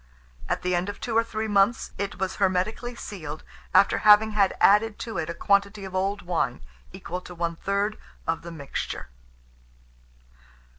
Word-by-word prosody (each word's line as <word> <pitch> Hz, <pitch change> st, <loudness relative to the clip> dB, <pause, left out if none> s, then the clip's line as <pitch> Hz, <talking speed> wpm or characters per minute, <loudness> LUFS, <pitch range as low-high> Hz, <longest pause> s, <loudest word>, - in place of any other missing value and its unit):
At -, -, -1 dB
the 180 Hz, 0 st, 0 dB
end 175 Hz, +3 st, 0 dB
of 205 Hz, -, -7 dB
two 230 Hz, -, -3 dB
or 230 Hz, -, +5 dB
three 220 Hz, -1 st, -3 dB
months, 205 Hz, +2 st, +2 dB
it 200 Hz, 0 st, -3 dB
was 190 Hz, 0 st, -2 dB
hermetically 200 Hz, +5 st, 0 dB
sealed, 155 Hz, -9 st, -7 dB, 0.3 s
after 200 Hz, -, +5 dB
having 215 Hz, +1 st, +6 dB
had 200 Hz, -2 st, +2 dB
added 210 Hz, +1 st, +4 dB
to 225 Hz, -7 st, -4 dB
it 160 Hz, 0 st, -3 dB
a 170 Hz, -, -4 dB
quantity 200 Hz, +1 st, +1 dB
of 190 Hz, -, -8 dB
old 195 Hz, +1 st, -1 dB
wine, 175 Hz, -, -1 dB, 0.3 s
equal 180 Hz, -, -6 dB
to 180 Hz, -, -11 dB
one 170 Hz, 0 st, -2 dB
third 200 Hz, +4 st, -1 dB, 0.3 s
of 165 Hz, 0 st, -1 dB
the 170 Hz, -, -8 dB
mixture. 140 Hz, -, -5 dB
200 Hz, 165 wpm, -26 LUFS, 180-210 Hz, 0.3 s, having